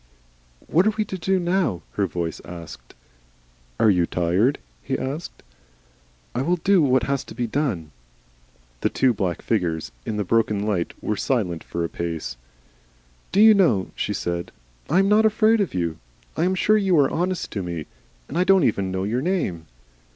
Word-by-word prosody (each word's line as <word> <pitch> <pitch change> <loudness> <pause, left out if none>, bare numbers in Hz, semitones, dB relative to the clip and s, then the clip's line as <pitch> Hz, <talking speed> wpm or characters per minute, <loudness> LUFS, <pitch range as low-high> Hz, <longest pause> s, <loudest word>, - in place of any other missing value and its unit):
"What 180 +6 +3
are 215 - +2
we 215 - +1
to 190 - -5
do 190 +2 +1
now?" 175 - 0
her 100 -2 0
voice 85 -1 -4
asked. 85 -2 -10 0.8
"Are 110 - +5
you 90 -3 +2
tired?" 90 +10 +1 0.2
he - - -2
asked. 140 +6 -5 0.9
"I 125 - -1
will 170 +6 +2
do 185 +2 +3
what 130 -4 +3
has 140 +1 -1
to - - -11
be 120 0 -1
done." 110 - -2 0.9
The - - +1
two 130 -2 +2
black 95 -5 -2
figures 85 - -1
in 105 - -3
the 105 - 0
broken 105 0 +1
light 95 -6 -1
were 105 - 0
silent 95 - -1
for 85 0 -3
a - - -1
space. 80 -7 -4 1.0
"Do 200 - +3
you 220 0 +9
know," 150 - +2
she - - -2
said, 85 0 -3 0.4
"I 170 - +3
am 195 +1 +4
not 210 +2 +5
afraid 220 0 +3
of 195 - -2
you. 85 -3 -2 0.4
I 165 - +1
am 185 +1 +1
sure 215 +3 +3
you 190 -4 +2
are 140 -2 +4
honest 180 +1 -2
to 100 - -3
me. 85 -4 -4 0.4
And 165 - -3
I - - +5
do 195 +1 +5
not 190 - +3
even 100 -4 +1
know 95 0 -2
your 115 +6 -1
name!" 135 - -2
120 Hz, 185 wpm, -23 LUFS, -, 1.0 s, you